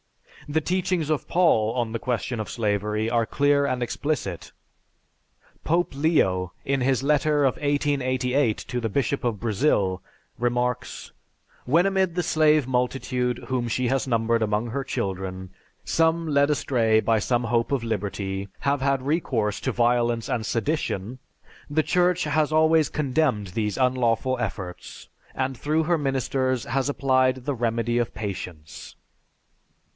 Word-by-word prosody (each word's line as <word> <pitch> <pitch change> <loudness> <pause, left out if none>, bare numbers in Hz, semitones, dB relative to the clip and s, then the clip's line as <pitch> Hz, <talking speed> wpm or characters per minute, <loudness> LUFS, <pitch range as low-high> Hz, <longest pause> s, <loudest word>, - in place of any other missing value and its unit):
The 160 +2 +1
teachings 180 -2 -1
of 155 - -1
Paul 115 -11 +3
on 120 -3 -1
the 115 - -3
question 120 -1 -2
of 110 - -4
slavery 105 -1 -1
are 115 -1 +1
clear 145 0 +2
and 125 -2 -1
explicit. 120 - -3 1.1
Pope 170 0 +1
Leo, 95 - +1
in 135 -1 0
his 130 0 +1
letter 150 0 +2
of 130 - +3
1888 135 -4 0
to 125 - -4
the 115 - -1
Bishop 135 +4 -1
of 115 -4 -1
Brazil, 100 -5 +1 0.4
remarks: 125 +1 -2 0.5
"When 165 +8 +3
amid 190 -3 +1
the 180 - 0
slave 155 -4 +3
multitude 125 -1 -1
whom 125 -2 -1
she 125 +2 0
has 135 +1 0
numbered 115 -1 +1
among 110 +2 0
her 140 +3 -2
children, 95 -6 -4 0.3
some 165 0 +1
led 140 -1 +3
astray 120 -6 +2
by 110 0 +2
some 120 +2 0
hope 115 +2 0
of 135 -4 0
liberty, 100 -3 -3
have 140 -1 0
had 135 -1 +1
recourse 130 - 0
to 130 - -1
violence 120 -1 +1
and 115 - -1
sedition, 120 -3 -2 0.5
the 155 +2 +1
Church 180 +1 +2
has 150 0 +1
always 155 -1 +4
condemned 135 -8 0
these 105 +2 -2
unlawful 125 -1 +1
efforts, 95 -7 -6 0.3
and 130 0 -1
through 155 +5 0
her 170 0 +1
ministers 130 -2 0
has 135 +1 -1
applied 130 -2 +1
the 145 - 0
remedy 120 0 0
of 120 - -2
patience...." 90 -8 -7
125 Hz, 140 wpm, -25 LUFS, 115-145 Hz, 1.1 s, always